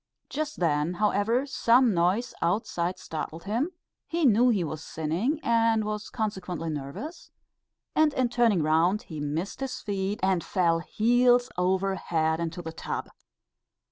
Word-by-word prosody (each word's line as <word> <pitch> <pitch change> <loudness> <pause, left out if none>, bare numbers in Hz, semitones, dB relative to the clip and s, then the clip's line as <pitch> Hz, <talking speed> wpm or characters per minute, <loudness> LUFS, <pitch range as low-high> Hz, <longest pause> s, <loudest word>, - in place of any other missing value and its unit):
Just 305 +1 -4
then, 160 0 +1
however, 210 +6 +1
some 250 -3 +3
noise 185 +8 +1
outside 175 -1 0
startled 160 +1 -6
him, 235 - -1 0.4
he 335 -1 0
knew 245 +1 +5
he 205 -7 +2
was 155 -1 -5
sinning, 175 - -1
and 230 -1 +3
was 210 0 -4
consequently 190 -7 -3
nervous, 150 - -7 0.7
and 310 -1 +4
in 255 -1 +2
turning 230 -8 +3
round, 165 +7 +2
he 155 -3 -8
missed 150 +6 -3
his 260 -1 -4
feet, 200 0 -2
and 190 -3 +2
fell 170 -3 +1
heels 245 +6 +3
over 190 +2 +1
head 160 -3 0
into 170 +1 -4
the 160 0 -6
tub. - - -5
195 Hz, 140 wpm, -27 LUFS, 170-235 Hz, 0.7 s, knew